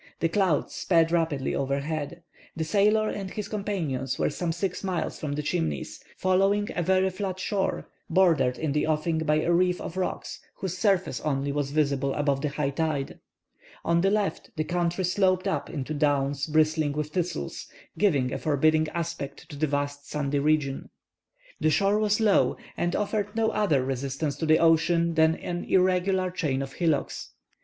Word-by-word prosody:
The 165 Hz, -, +1 dB
clouds 185 Hz, -5 st, +1 dB
sped 165 Hz, -2 st, +2 dB
rapidly 160 Hz, -6 st, 0 dB
overhead. 145 Hz, +4 st, -2 dB, 0.3 s
The 160 Hz, -, -2 dB
sailor 210 Hz, +6 st, +3 dB
and 195 Hz, -3 st, -4 dB
his 210 Hz, +2 st, -5 dB
companions 165 Hz, -, -2 dB
were -, -, +1 dB
some 170 Hz, +3 st, -2 dB
six 180 Hz, +3 st, -3 dB
miles 185 Hz, -3 st, -2 dB
from 150 Hz, -2 st, -3 dB
the 150 Hz, +1 st, -3 dB
Chimneys, 80 Hz, -, -2 dB
following 195 Hz, +3 st, +2 dB
a 175 Hz, -, 0 dB
very 190 Hz, +2 st, +2 dB
flat 190 Hz, -1 st, -4 dB
shore, 195 Hz, 0 st, -1 dB, 0.2 s
bordered 165 Hz, -9 st, +3 dB
in 155 Hz, -2 st, -1 dB
the 150 Hz, +2 st, 0 dB
offing 160 Hz, +1 st, 0 dB
by 155 Hz, -1 st, +2 dB
a 175 Hz, -, +2 dB
reef 180 Hz, +1 st, +2 dB
of 180 Hz, -, -6 dB
rocks 185 Hz, -, -3 dB, 0.2 s
whose 185 Hz, -2 st, -4 dB
surface 185 Hz, -, +1 dB
only 140 Hz, -1 st, -1 dB
was 145 Hz, -1 st, -1 dB
visible 140 Hz, -2 st, 0 dB
above 140 Hz, -2 st, 0 dB
the 150 Hz, -, 0 dB
high 140 Hz, -1 st, -1 dB
tide. 150 Hz, -2 st, -2 dB, 0.7 s
On 170 Hz, 0 st, +3 dB
the 195 Hz, -, +3 dB
left 205 Hz, 0 st, -1 dB
the 155 Hz, -, 0 dB
country 175 Hz, +2 st, -1 dB
sloped 185 Hz, +1 st, +2 dB
up 195 Hz, -, -2 dB
into 150 Hz, -1 st, -4 dB
downs 140 Hz, -1 st, +1 dB
bristling 155 Hz, -1 st, +2 dB
with 150 Hz, 0 st, -3 dB
thistles, 165 Hz, -, -3 dB, 0.3 s
giving 140 Hz, -11 st, +2 dB
a -, -, -3 dB
forbidding 155 Hz, +1 st, +2 dB
aspect 170 Hz, -5 st, -4 dB
to -, -, -8 dB
the 155 Hz, +2 st, 0 dB
vast 145 Hz, 0 st, -3 dB
sandy 145 Hz, -1 st, -1 dB
region. 145 Hz, -2 st, 0 dB, 0.7 s
The 155 Hz, -, +2 dB
shore 195 Hz, +7 st, +2 dB
was 210 Hz, 0 st, +2 dB
low, 215 Hz, -3 st, +3 dB, 0.2 s
and 175 Hz, 0 st, -1 dB
offered 210 Hz, 0 st, -1 dB
no 225 Hz, -1 st, +2 dB
other 155 Hz, -12 st, +1 dB
resistance 135 Hz, +2 st, -2 dB
to 160 Hz, -, -2 dB
the 155 Hz, 0 st, +6 dB
ocean 165 Hz, +1 st, +3 dB
than 160 Hz, 0 st, +4 dB
an 175 Hz, +1 st, -4 dB
irregular 185 Hz, 0 st, +2 dB
chain 140 Hz, -7 st, -1 dB
of 135 Hz, 0 st, -8 dB
hillocks. 160 Hz, -5 st, -1 dB
160 Hz, 170 wpm, -27 LUFS, 145-185 Hz, 0.7 s, the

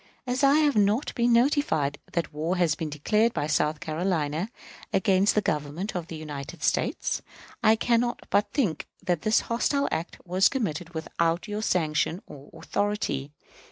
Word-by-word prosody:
As 255 Hz, +2 st, -1 dB
I 275 Hz, +1 st, +6 dB
have 300 Hz, -3 st, +3 dB
not 210 Hz, +5 st, +2 dB
been 240 Hz, -1 st, +2 dB
notified 235 Hz, -, +2 dB
that 170 Hz, -3 st, -2 dB
war 160 Hz, +5 st, -1 dB
has 170 Hz, -4 st, +3 dB
been 155 Hz, +1 st, -4 dB
declared 210 Hz, +10 st, +1 dB
by -, -, 0 dB
South 150 Hz, 0 st, +1 dB
Carolina 160 Hz, +2 st, -1 dB, 0.4 s
against 195 Hz, 0 st, +3 dB
the 210 Hz, -, +2 dB
Government 150 Hz, +7 st, -2 dB
of 175 Hz, -2 st, -3 dB
the 165 Hz, -, -7 dB
United 150 Hz, -3 st, -7 dB
States, -, -, 0 dB, 0.4 s
I 220 Hz, -1 st, +5 dB
can 235 Hz, +1 st, +2 dB
not 240 Hz, 0 st, -2 dB
but 205 Hz, -, +3 dB
think 220 Hz, -, -1 dB, 0.2 s
that 175 Hz, -4 st, 0 dB
this 215 Hz, +1 st, +3 dB
hostile 280 Hz, +4 st, 0 dB
act 160 Hz, +2 st, -3 dB
was 185 Hz, +2 st, +4 dB
committed 180 Hz, -, -3 dB
without 165 Hz, +4 st, -1 dB
your 210 Hz, 0 st, -3 dB
sanction 165 Hz, -3 st, +1 dB
or 145 Hz, -1 st, -12 dB
authority. 205 Hz, -9 st, -2 dB
180 Hz, 160 wpm, -27 LUFS, 155-225 Hz, 0.4 s, I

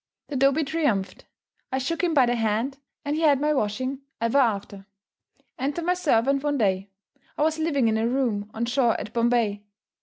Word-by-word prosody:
The 290 Hz, -, -4 dB
dobee 275 Hz, +4 st, +3 dB
triumphed. 275 Hz, -11 st, -1 dB, 0.5 s
I 260 Hz, -, 0 dB
shook 300 Hz, +7 st, -2 dB
him 340 Hz, -2 st, +1 dB
by 265 Hz, -3 st, +6 dB
the 240 Hz, -, +1 dB
hand, 230 Hz, +4 st, -1 dB, 0.3 s
and 290 Hz, +1 st, -1 dB
he 315 Hz, -, -2 dB
had 290 Hz, -4 st, +4 dB
my 300 Hz, +1 st, +1 dB
washing 255 Hz, +2 st, -2 dB, 0.2 s
ever 230 Hz, +5 st, +2 dB
after. 200 Hz, -5 st, -1 dB, 0.7 s
Enter 285 Hz, +6 st, -2 dB
my 355 Hz, +2 st, +2 dB
servant 275 Hz, -6 st, +2 dB
one 290 Hz, -1 st, 0 dB
day. 195 Hz, -3 st, 0 dB, 0.5 s
I -, -, +1 dB
was 315 Hz, +1 st, +1 dB
living 285 Hz, -6 st, +1 dB
in 220 Hz, 0 st, +1 dB
a 225 Hz, -, +1 dB
room 235 Hz, -5 st, -1 dB
on 230 Hz, +2 st, -2 dB
shore 245 Hz, -1 st, +1 dB
at 215 Hz, -, -7 dB
Bombay. 235 Hz, -3 st, +1 dB
260 Hz, 185 wpm, -25 LUFS, 225-290 Hz, 0.7 s, by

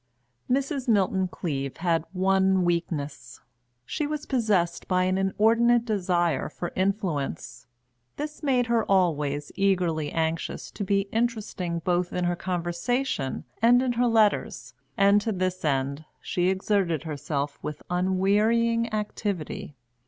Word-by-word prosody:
Mrs. 275 Hz, +1 st, 0 dB
Milton 190 Hz, -4 st, +2 dB
Cleave 140 Hz, -7 st, -4 dB
had 165 Hz, -2 st, 0 dB
one 190 Hz, 0 st, +2 dB
weakness 165 Hz, -4 st, -3 dB, 0.5 s
she 295 Hz, -, -2 dB
was 300 Hz, 0 st, -4 dB
possessed 205 Hz, -9 st, 0 dB
by 185 Hz, -1 st, +2 dB
an 185 Hz, +1 st, +1 dB
inordinate 230 Hz, +5 st, +3 dB
desire 175 Hz, -, 0 dB
for 175 Hz, +3 st, -5 dB
influence. 185 Hz, -, -2 dB, 0.5 s
This 300 Hz, +1 st, -5 dB
made 260 Hz, -5 st, +2 dB
her 235 Hz, -1 st, +2 dB
always 150 Hz, -6 st, +1 dB
eagerly 180 Hz, -6 st, +1 dB
anxious 165 Hz, 0 st, -2 dB
to 205 Hz, -, -5 dB
be 195 Hz, 0 st, +2 dB
interesting 210 Hz, -7 st, -2 dB
both 180 Hz, 0 st, 0 dB
in 180 Hz, -, -1 dB
her 175 Hz, 0 st, +1 dB
conversation 175 Hz, -, -2 dB, 0.2 s
and 245 Hz, +2 st, +5 dB
in 255 Hz, -, +1 dB
her 245 Hz, +1 st, +2 dB
letters, 220 Hz, -3 st, +1 dB, 0.2 s
and 200 Hz, +1 st, +5 dB
to 225 Hz, -, -1 dB
this 185 Hz, -2 st, -2 dB
end 140 Hz, 0 st, -1 dB
she 180 Hz, 0 st, 0 dB
exerted 190 Hz, -4 st, 0 dB
herself 145 Hz, -2 st, -3 dB
with 150 Hz, -, -6 dB
unwearying 210 Hz, +6 st, +2 dB
activity. 205 Hz, -8 st, -3 dB
185 Hz, 125 wpm, -26 LUFS, 170-220 Hz, 0.5 s, and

